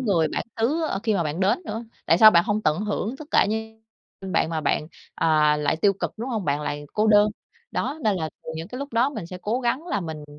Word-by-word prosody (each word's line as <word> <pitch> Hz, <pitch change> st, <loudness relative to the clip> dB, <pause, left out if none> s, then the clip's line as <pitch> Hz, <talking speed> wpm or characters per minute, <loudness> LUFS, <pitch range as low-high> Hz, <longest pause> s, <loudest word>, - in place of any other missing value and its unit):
người 190 Hz, -10 st, +2 dB
bản -, -, -2 dB, 0.2 s
xứ, 285 Hz, +9 st, +1 dB
ơ, -, -, -2 dB
khi 220 Hz, -3 st, +1 dB
mà 180 Hz, -, +1 dB
bạn 155 Hz, +2 st, -3 dB
đến 195 Hz, +2 st, +3 dB
nữa, 220 Hz, +2 st, -4 dB, 0.2 s
tại 165 Hz, -, +4 dB
sao 215 Hz, +2 st, +10 dB
bạn 170 Hz, -3 st, +4 dB
hông 215 Hz, 0 st, -1 dB
tận 155 Hz, +1 st, +1 dB
hưởng 210 Hz, +3 st, -2 dB
tất 305 Hz, -, -9 dB
cả -, -, +4 dB
như 220 Hz, +1 st, -4 dB, 0.4 s
ưm, 190 Hz, -1 st, -6 dB
bạn -, -, +2 dB
mà 160 Hz, -1 st, -1 dB
bạn, 150 Hz, +1 st, 0 dB, 0.3 s
à, 150 Hz, -2 st, +3 dB
lại 150 Hz, +1 st, 0 dB
tiêu 195 Hz, +5 st, +3 dB
cực, 195 Hz, -, -4 dB
đúng 235 Hz, +4 st, -5 dB
hông? 220 Hz, -6 st, -2 dB
Bạn 145 Hz, 0 st, 0 dB
lại 145 Hz, 0 st, -4 dB
cô 215 Hz, +1 st, +1 dB
đơn. 210 Hz, 0 st, +6 dB, 0.4 s
Đó, 285 Hz, +4 st, -2 dB
nên 210 Hz, -3 st, +2 dB
là, 160 Hz, -3 st, -2 dB
ừ, 160 Hz, -, -6 dB
những 165 Hz, +2 st, -6 dB
cái 250 Hz, -, -7 dB
lúc 280 Hz, -1 st, -6 dB
đó 240 Hz, +5 st, +2 dB
mình 185 Hz, -, -6 dB
sẽ 180 Hz, +1 st, -8 dB
cố 235 Hz, +5 st, -1 dB
gắng 255 Hz, +7 st, -1 dB
là 205 Hz, -, -1 dB
mình, 160 Hz, -4 st, -6 dB
205 Hz, 265 wpm, -24 LUFS, 160-225 Hz, 0.4 s, sao